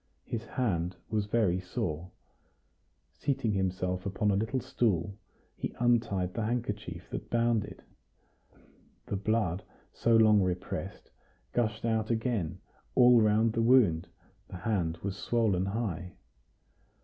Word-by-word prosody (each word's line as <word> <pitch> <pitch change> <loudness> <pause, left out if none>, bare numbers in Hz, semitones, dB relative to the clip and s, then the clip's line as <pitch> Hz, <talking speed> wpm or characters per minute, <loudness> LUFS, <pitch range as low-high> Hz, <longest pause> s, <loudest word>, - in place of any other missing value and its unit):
His 115 0 -4
hand 95 -8 -1 0.2
was 105 -2 0
very 105 -5 +2
sore. 90 -2 -4 1.0
Seating 135 -5 -1
himself 90 -1 -1
upon 100 +1 0
a - - +2
little 110 +6 0
stool, 100 -7 0 0.4
he - - -5
untied 115 -7 +1
the 115 - -2
handkerchief 105 -6 -3
that - - -5
bound 115 -2 +2
it; - - -12 1.2
the - - -3
blood, 100 -3 0 0.3
so 115 0 +2
long 110 -2 +6
repressed, 90 -1 -4 0.4
gushed 110 -2 0
out 110 -1 0
again; 110 -7 -1 0.4
all 125 -1 +7
round 110 +1 +3
the 115 - +1
wound 115 -9 +4 0.4
the 95 - -8
hand 90 -6 -1
was 100 -1 -2
swollen 105 -4 +1
high. 95 -5 -3
105 Hz, 125 wpm, -30 LUFS, 90-115 Hz, 1.2 s, all